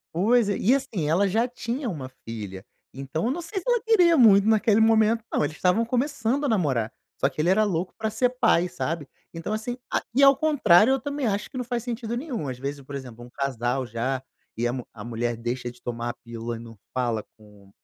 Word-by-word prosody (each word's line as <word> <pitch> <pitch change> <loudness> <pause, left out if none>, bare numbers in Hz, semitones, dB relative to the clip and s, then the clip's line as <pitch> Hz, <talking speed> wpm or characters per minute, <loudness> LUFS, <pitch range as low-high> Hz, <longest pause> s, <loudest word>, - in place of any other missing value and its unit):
Pois 225 +5 +3
é 205 - 0
e, 240 +6 +3
assim, 195 - -1
ela 190 +5 +3
já 225 +5 +2
tinha 245 +1 -4
uma 140 -8 -5 0.2
filha, 105 -3 -7 0.3
então 135 +6 -3
eu 245 - +1
não 345 - -3
sei 380 +4 -4
se - - -14
ela 485 -2 +3
queria 360 -7 +5
muito 205 -4 +6
naquele 220 0 +4
momento 225 0 +4
não, - - 0
eles 155 +2 -3
estavam 185 +5 +2
começando 260 +2 0
a - - +2
namorar. 145 - +1 0.3
Só 135 - +3
que 145 - -3
ele 170 - +2
era 215 +3 +4
louco 180 -2 -2
pra 220 -1 -1
ser 245 +4 +1
pai, 225 -8 +2
sabe. 160 -5 -3 0.3
Então, 165 +4 -5
assim, 220 +3 -3
a - - +1
e 275 - +5
ao 275 - +9
contrário, 255 - +5
eu 270 - -1
também 285 -1 -2
acho 205 0 -1
que 260 - -8
não 250 - -3
faz 240 -2 -2
sentido 235 -1 -4
nenhum, 245 - -4
às 130 -2 -4
vezes, 140 +2 -5
por 140 +1 -9
exemplo, 120 -3 -8
um 125 - -14
casal 130 -1 -2
já 125 +3 -2 0.3
e 120 - 0
a 120 - +1
mu 125 -1 -5
a 105 - -9
mulher 120 +1 -2
deixa 120 +2 -3
de 120 0 -15
tomar 120 0 -3
a - - -12
pílula 115 0 -5
e 115 - -8
não 115 -1 -11 0.2
fala 120 -4 0 0.2
com 105 -2 -18
180 Hz, 230 wpm, -25 LUFS, -, 0.3 s, ao